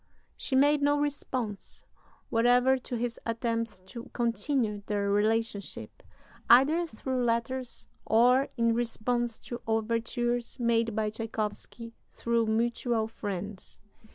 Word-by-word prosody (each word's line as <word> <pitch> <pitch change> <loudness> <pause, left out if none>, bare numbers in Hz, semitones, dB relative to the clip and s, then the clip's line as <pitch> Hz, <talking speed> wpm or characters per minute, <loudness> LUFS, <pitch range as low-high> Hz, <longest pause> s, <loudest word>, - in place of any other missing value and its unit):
She 265 - -2
made 290 +2 +4
no 290 0 +3
response 255 -7 -3 0.5
whatever 245 +3 +4
to 250 - -5
his 235 0 -3
attempts 230 -3 -2
to 235 +7 -10
continue 235 -2 0
their 200 -1 0
relationship, 215 0 -1 0.5
either 300 +8 +6
through 255 -1 -2
letters 240 +2 -2 0.2
or 250 +4 +4
in 230 -1 +3
response 240 0 -1
to 240 - -7
overtures 230 +2 -1
made 230 -2 +1
by 215 -1 0
Tschaikowsky 220 0 -5 0.2
through 235 -1 0
mutual 230 0 0
friends. 200 -3 -6
230 Hz, 110 wpm, -29 LUFS, 220-245 Hz, 0.5 s, either